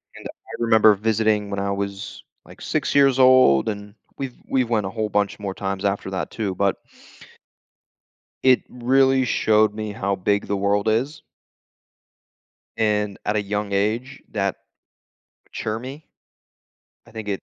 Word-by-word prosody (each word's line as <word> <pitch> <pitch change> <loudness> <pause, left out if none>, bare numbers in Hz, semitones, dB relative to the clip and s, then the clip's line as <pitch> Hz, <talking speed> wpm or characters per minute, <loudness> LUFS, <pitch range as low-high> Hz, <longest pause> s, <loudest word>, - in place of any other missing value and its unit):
And - - -12
I - - -13
remember 110 -2 +6
visiting 110 -1 0
when 100 -1 -3
I 100 0 -1
was, 100 0 -5 0.2
like, - - -15
6 - - -1
years 135 -2 +4
old, 130 - +5
and 105 0 -7 0.2
we've 135 -3 -5
we've 130 -3 0
went 110 -4 +1
a - - -3
whole 110 -1 -2
bunch 105 0 0
more 100 -2 -5
times 95 0 -3
after 100 -1 -1
that 95 -2 -3
too, 105 -4 -3
but 100 0 +1 1.7
it 130 -2 +5
really 130 +2 +2
showed 110 -2 +2
me 110 -1 -5
how 100 0 -1
big 100 +2 0
the 100 - -1
world 100 +2 +1
is. 135 +8 -1 1.5
And 105 -2 0
at 105 - 0
a 105 - +1
young 105 0 -3
age, 115 +7 -1
that 100 -3 -1 0.9
mature 110 0 -4
me. 135 +6 -9 1.0
I - - -17
think 110 -2 -8
it 100 -1 -3
105 Hz, 150 wpm, -22 LUFS, 100-115 Hz, 1.7 s, remember